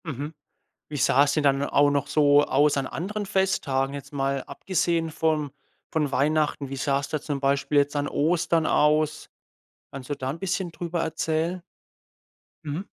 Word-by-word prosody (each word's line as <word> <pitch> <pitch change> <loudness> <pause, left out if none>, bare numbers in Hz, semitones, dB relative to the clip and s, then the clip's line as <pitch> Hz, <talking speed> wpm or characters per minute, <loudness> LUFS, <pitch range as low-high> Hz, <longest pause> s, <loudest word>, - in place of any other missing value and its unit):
Mhm. 145 0 -5 0.6
Wie 150 - -5
sah 135 +1 +4
es 145 - 0
denn 155 - +1
dann 140 -1 +2
auch 145 0 +3
noch 140 0 0
so 145 -1 +4
aus 145 +1 +2
an 135 -1 -1
anderen 200 +11 -4
Festtagen, 165 -9 0
jetzt 140 0 -8
mal 135 -1 -1
abgesehen 165 +2 -1
von 155 -2 0 0.4
von 150 -3 0
Weihnachten? 150 0 +1
Wie 135 - -5
sah 140 0 0
es 140 - -6
da 155 - -2
zum 145 -1 -4
Beispiel 140 +1 +1
jetzt 145 +1 +1
an 145 0 -1
Ostern 165 +1 +1
aus? 150 0 +2 0.6
Kannst 135 -1 -9
du 145 - -1
da 130 -1 -4
'n 150 +5 -5
bisschen 185 -1 -2
drüber 170 0 -3
erzählen? 160 +2 -1 1.0
Mhm. 150 +5 -4
150 Hz, 170 wpm, -25 LUFS, 140-160 Hz, 1.0 s, sah